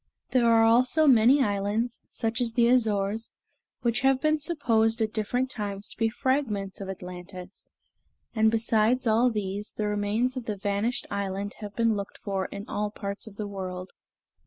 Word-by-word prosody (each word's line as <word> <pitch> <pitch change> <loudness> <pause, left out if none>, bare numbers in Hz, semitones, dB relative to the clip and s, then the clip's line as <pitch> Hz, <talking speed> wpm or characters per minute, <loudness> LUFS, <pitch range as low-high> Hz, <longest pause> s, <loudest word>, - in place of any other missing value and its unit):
There 245 -2 +3
are 225 0 +5
also 250 +7 +4
many 260 +1 +6
islands, 205 +3 -1
such 225 +2 -2
as 235 -2 0
the 235 0 +4
Azores, 220 -3 +1 0.5
which 235 0 +1
have 270 0 +3
been 310 +2 +2
supposed 230 -9 +1
at 220 -1 -1
different 245 +4 -1
times 205 -1 -4
to - - -11
be 225 -1 +2
fragments 220 -6 -1
of 195 - -6
Atlantis; 180 0 -9 0.6
and 220 -1 +4
besides 225 +2 +2
all 230 +2 +4
this, 205 -2 -3
the 215 - -3
remains 210 +5 0
of 255 -3 -5
the 210 -3 -3
vanished 205 +5 -1
island 200 0 -3
have 205 -2 -8
been 230 0 +2
looked 200 -1 -5
for 195 -2 -3
in 200 0 -8
all 210 0 -2
parts 200 +1 -5
of 210 - -11
the 210 - -4
world. 185 -2 -6
220 Hz, 170 wpm, -27 LUFS, 200-240 Hz, 0.6 s, many